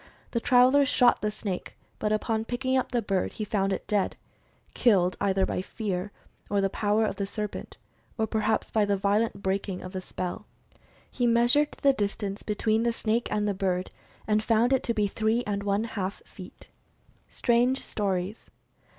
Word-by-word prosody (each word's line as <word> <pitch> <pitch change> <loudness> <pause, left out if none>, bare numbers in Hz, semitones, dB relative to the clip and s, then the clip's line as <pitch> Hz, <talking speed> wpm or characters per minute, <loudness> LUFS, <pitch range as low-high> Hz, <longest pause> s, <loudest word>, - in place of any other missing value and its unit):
The 235 - 0
traveler 255 +4 +5
shot 250 -2 +4
the 210 - 0
snake, 200 -3 -5 0.2
but 210 - 0
upon 220 +1 0
picking 260 +2 -1
up 260 - 0
the 240 -2 0
bird, 195 -2 -1
he 215 - -4
found 200 -2 0
it 190 - -3
dead 205 -2 0 0.3
— - - -36
killed 185 -6 +3
either 190 -1 +2
by - - -2
fear 195 -1 -4 0.4
or 205 - +1
the 195 -1 +1
power 215 +1 +1
of - - -3
the 200 - -2
serpent, 210 0 -5 0.4
or 220 - +1
perhaps 220 0 0
by 215 - +3
the 200 -1 +1
violent 200 +1 0
breaking 190 -1 -2
of 185 - -7
the 185 -1 -4
spell. 185 +3 -5 0.6
He 245 -2 0
measured 240 +6 +3
the 275 -1 +6
distance 205 -2 -3
between 220 +1 0
the 235 0 +1
snake 230 +1 -1
and 210 0 0
the 205 - +1
bird 185 -1 -1 0.3
and 215 0 +2
found 230 +3 +3
it 265 - +3
to 235 - +1
be 210 - +2
three 220 +4 0
and 200 -1 -2
one 200 +1 0
half 200 -4 -4
feet. - - -12 0.6
STRANGE 245 +2 +2
STORIES. 195 0 -2
210 Hz, 180 wpm, -27 LUFS, 195-235 Hz, 0.6 s, the